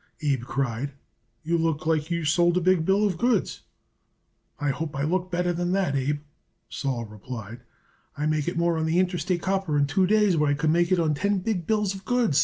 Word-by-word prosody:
Abe 140 -5 +1
cried. 135 +1 -2 0.5
"You 170 +1 0
look 160 -2 -1
like 160 -1 +1
you 170 -2 -1
sold 175 +2 +3
a - - +4
big 180 -2 +2
bill 195 +3 +3
of 185 -5 -1
goods." 240 -5 +1 1.0
"I 145 -1 +1
hope 150 +2 -4
I 140 - -1
look 180 +4 0
better 175 0 0
than 175 +1 -1
that, 190 -7 +1
Abe," 145 +2 -1 0.5
Sol 130 -4 -3
replied. 110 +2 -8 0.6
"I 150 - -1
make 155 -1 0
it 175 - -2
more 170 -1 +1
on 160 - 0
that 160 - 0
Interstate 180 -1 0
Copper 190 -5 0
in 145 - +3
two 180 +6 +2
days 210 -3 +3
what 150 -1 +2
I 145 - +2
could 155 +1 +1
make 170 +2 +2
it 185 - +4
on 160 -2 +2
ten 200 +7 0
big 185 -3 -2
bills 210 -3 +1
of 195 0 -9
goods. 240 - +2
165 Hz, 210 wpm, -25 LUFS, 145-185 Hz, 1.0 s, a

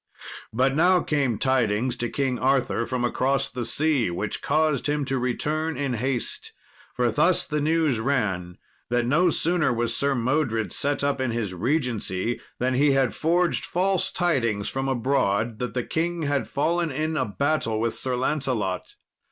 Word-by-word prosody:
But 130 +4 +2
now 180 +3 +4
came 140 -9 0
tidings 125 -1 +1
to 120 -1 -2
King 130 -2 -1
Arthur 130 -3 +1
from 125 -1 -1
across 130 +2 +1
the 125 -1 -4
sea, 145 - +1
which 95 +5 -3
caused 155 -2 +1
him 145 -1 0
to 135 -1 -1
return 150 +6 -1
in 140 -3 -1
haste. 125 +1 -2 0.4
For 120 -1 +1
thus 180 +10 +3
the 150 0 -2
news 155 -5 +2
ran, 100 -9 -1 0.3
that 120 0 +1
no 165 +8 +3
sooner 165 -3 +2
was 120 0 -1
Sir 140 0 +1
Modred 125 -3 0
set 145 0 0
up 140 -1 0
in 130 - 0
his 115 -5 -2
regency, 120 - -1 0.2
than 130 +1 0
he 140 +2 +3
had 135 -3 +2
forged 170 +2 +1
false 190 +1 +1
tidings 115 - 0
from 135 0 -2
abroad 115 -4 0
that 125 - -4
the 125 - 0
king 170 +3 -2
had 145 -1 0
fallen 165 +3 0
in 155 +3 -2
a - - +1
battle 115 -1 0
with 115 +1 0
Sir 130 -1 -1
Lancelot. 125 -8 -2
135 Hz, 165 wpm, -25 LUFS, 120-150 Hz, 0.4 s, now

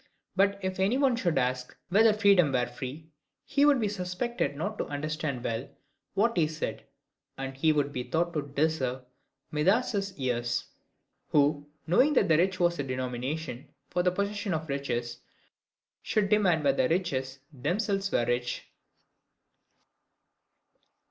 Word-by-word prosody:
But 200 +1 +3
if 185 0 -2
any 200 +7 +2
one 270 -3 +3
should 175 -10 0
ask, 125 -1 -1
whether 220 +4 +6
freedom 200 -7 +4
were 125 -2 +2
free, 135 +6 -8 0.3
he 285 +1 +3
would 290 -3 +5
be 215 - +1
suspected 185 - -2
not 200 +9 -4
to - - -1
understand 145 -3 -3
well 115 +3 -3 0.5
what 230 +4 +2
he 160 -3 +3
said; 155 0 -5 0.5
and 135 0 -5
he 155 +4 +3
would 145 -2 0
be 125 - -2
thought 170 +6 -1
to 150 - 0
deserve 140 -3 -1 0.5
Midas's 195 +4 +1
ears, 120 -3 -1 0.6
who, 145 0 +2 0.2
knowing 255 - +4
that 260 - +3
rich 185 +4 +2
was 175 -2 +2
a - - 0
denomination 130 +2 -4 0.2
for 180 - +1
the 180 - +3
possession 200 0 -1
of 160 0 -5
riches, 120 -4 -2 0.8
should 210 -2 0
demand 190 -7 +3
whether 135 -2 +3
riches 135 -6 -1 0.2
themselves 195 - -1
were 120 - +2
rich. 120 0 -2
160 Hz, 140 wpm, -29 LUFS, 135-195 Hz, 0.8 s, whether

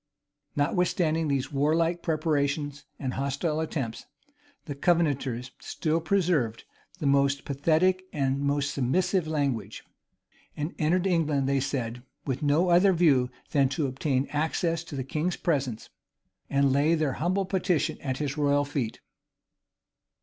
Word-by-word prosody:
[] - - -50
Notwithstanding 165 +1 +1
these 140 -1 -1
warlike 165 +4 +1
preparations 150 -2 -1
and 130 -2 -3
hostile 140 +3 -1
attempts, 135 -8 -4 0.6
the 145 - -4
Covenanters 140 -6 0
still 160 0 -1
preserved 160 - +1 0.3
the 165 - -5
most 140 0 +2
pathetic 165 +6 +2
and 135 -2 0
most 140 0 0
submissive 175 +6 +1
language; 135 -9 -2 0.7
and 150 +3 -3
entered 175 +4 +2
England, 155 -7 +1
they 140 0 +2
said, 125 -3 -3 0.2
with 135 -2 -2
no 155 +5 +2
other 180 +3 +5
view 145 -8 +3 0.2
than 140 -3 +3
to 145 +2 -1
obtain 135 0 0
access 160 +2 0
to 155 - -8
the 130 - -2
king's 155 +7 -1
presence, 135 -9 -2 0.6
and 140 -1 +3
lay 150 +4 +3
their 155 -4 0
humble 185 +4 +1
petition 185 -3 0
at 130 -2 -2
his 145 0 -3
royal 145 0 +3
feet. 135 -6 -3
145 Hz, 135 wpm, -27 LUFS, 135-165 Hz, 0.7 s, other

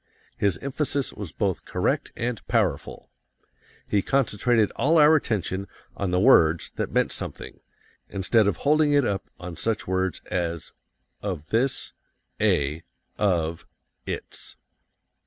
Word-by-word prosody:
His 100 -5 +1
emphasis 140 0 -1
was 100 -6 -7
both 100 -4 -1
correct - - -1
and 115 -2 -3
powerful. - - -1 0.8
He 100 - +2
concentrated 120 -3 +2
all 160 +4 +2
our 155 +1 +7
attention 100 - -1 0.3
on 100 - -2
the 90 0 +2
words 85 - +5
that - - -2
meant - - +2
something, - - -6 0.5
instead 100 +3 +2
of 100 - +1
holding 150 0 +4
it 145 -3 +4
up 100 -3 -2
on 90 -1 -7
such 110 +4 -1
words 95 -1 0
as 85 -2 -2 0.5
of 90 -5 -4
this, 125 +4 0 0.5
a, 75 +3 +2 0.4
of, 85 -5 0 0.4
It's. - - -6
100 Hz, 125 wpm, -25 LUFS, 90-125 Hz, 0.8 s, our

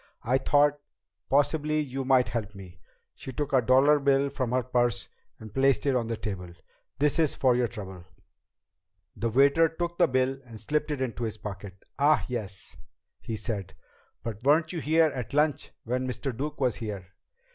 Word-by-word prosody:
I 130 +3 +2
thought 145 +2 +3 0.5
possibly 150 +2 +2
you 135 -2 -3
might 130 -1 +3
help 110 -3 -4
me." 90 -4 -12 0.3
She 130 - -8
took 145 +2 -4
a 130 - +5
dollar 135 +5 +5
bill 140 0 +2
from 130 -3 -2
her 125 0 +1
purse 120 -2 0 0.3
and 110 -2 -11
placed 135 +1 +2
it 140 -2 +2
on 120 -2 0
the 115 -1 -3
table. 90 -5 -5 0.5
"This 145 +3 +1
is 155 -3 +2
for 130 -2 +3
your 125 -1 +2
trouble." 95 -6 -9 1.1
The 115 - -1
waiter 140 +7 +4
took 170 +2 -4
the 175 - +6
bill 130 0 0
and 115 -3 -11
slipped 150 +9 -1
it 145 -3 -3
into 120 -2 -2
his 110 -1 -4
pocket. 100 -2 -8 0.2
"Ah, 150 +2 +4
yes," 100 -10 -6 0.4
he 110 - -5
said. 100 -5 -4 0.5
"But 110 -1 -5
weren't 155 +4 +3
you 165 - -3
here 160 +2 +4
at 125 -3 -6
lunch 150 -1 +1
when 125 +2 -2
Mr. 130 0 -3
Duke 145 +5 -4
was 130 -4 +1
here?" 100 -5 -6
130 Hz, 180 wpm, -27 LUFS, 110-145 Hz, 1.1 s, the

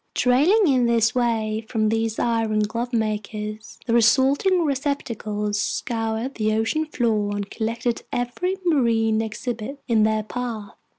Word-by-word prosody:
Trailing 305 - +4
in 255 -4 +3
this 230 -1 +3
way 225 -3 0
from 215 -2 +1
these 225 0 -1
iron 225 -2 +1
glove 230 +4 -2
makers, 215 -1 -3
the 235 - -1
resulting 275 - +4
receptacles 225 -7 -2
scoured 225 +3 -2
the 215 -3 0
ocean 225 +9 0
floor 215 -7 0
and 205 -1 -3
collected 230 +1 -2
every 245 +10 -2
marine 225 -8 +2
exhibit 225 +4 -5
in 230 -3 +3
their 215 0 +2
path. 225 -2 -5
225 Hz, 130 wpm, -23 LUFS, 215-250 Hz, -, Trailing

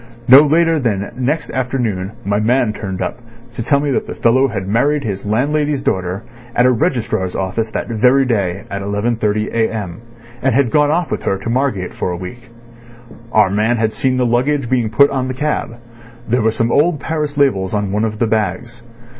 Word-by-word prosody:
No 130 +3 +10
later 165 +2 +3
than 105 -6 -1
next 140 +5 -2
afternoon 120 -7 -2
my 100 +1 +1
man 120 0 +2
turned 95 -4 -4
up - - -4 0.3
to 120 - -5
tell 140 +5 +2
me 145 0 -1
that - - -1
the - - -6
fellow 130 +4 +3
had 95 -6 -4
married 140 +8 +1
his 100 -3 -4
landlady's 145 +5 0
daughter 95 +2 -2 0.3
at 120 - +4
a 130 - +5
registrar's 120 - -1
office 95 +4 -2
that - - -4
very 125 +4 +3
day 100 -6 -1
at 100 0 -3
11.30 105 +1 -1
a.m., 110 -4 -2 0.4
and 130 -3 +1
had 130 -4 +2
gone 150 -1 +3
off 170 +2 0
with - - -2
her 95 - -1
to 115 +4 -4
Margate 120 -8 -1
for - - -3
a 90 - -3
week. 115 +8 -9 0.8
Our 105 -4 +4
man 110 +4 +1
had 110 -1 0
seen 130 +3 0
the 125 - +2
luggage 125 +2 0
being 120 -4 +1
put 140 +6 +4
on 130 -2 -1
the 130 - -4
cab. 150 -4 -2 0.5
There 125 +2 +1
were 110 - +3
some 115 +1 -1
old 155 +1 +2
Paris 150 -1 -3
labels 100 -10 +2
on 105 -2 -1
one 105 +2 0
of 110 -1 -2
the 115 - +1
bags. 110 +2 -2
115 Hz, 195 wpm, -17 LUFS, 105-135 Hz, 0.8 s, No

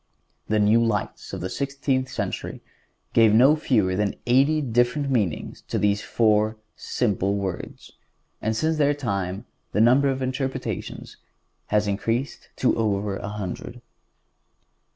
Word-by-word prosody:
The 110 - +1
new 105 +3 +4
lights 115 -3 -2
of - - -5
the 90 - -3
sixteenth 135 -2 -1
century - - -4 0.5
gave 110 -2 +5
no 135 +6 +6
fewer 110 -11 +1
than 100 0 0
eighty 135 +6 +4
different 125 +2 +1
meanings 105 - -1
to - - -2
these 105 0 +1
four 110 -1 +2 0.2
simple 100 -4 -1
words, 95 -3 -5 0.5
and 110 +1 -1
since 160 +5 +1
their 145 -1 +3
time 100 -8 -3 0.3
the 105 - +1
number 130 +5 +5
of 135 0 -1
interpretations 130 +1 -4 0.5
has 105 0 +1
increased 115 +6 -2
to 125 - +2
over 100 -2 0
a 100 - -6
hundred. 105 -4 -6
115 Hz, 130 wpm, -24 LUFS, 105-130 Hz, 0.5 s, no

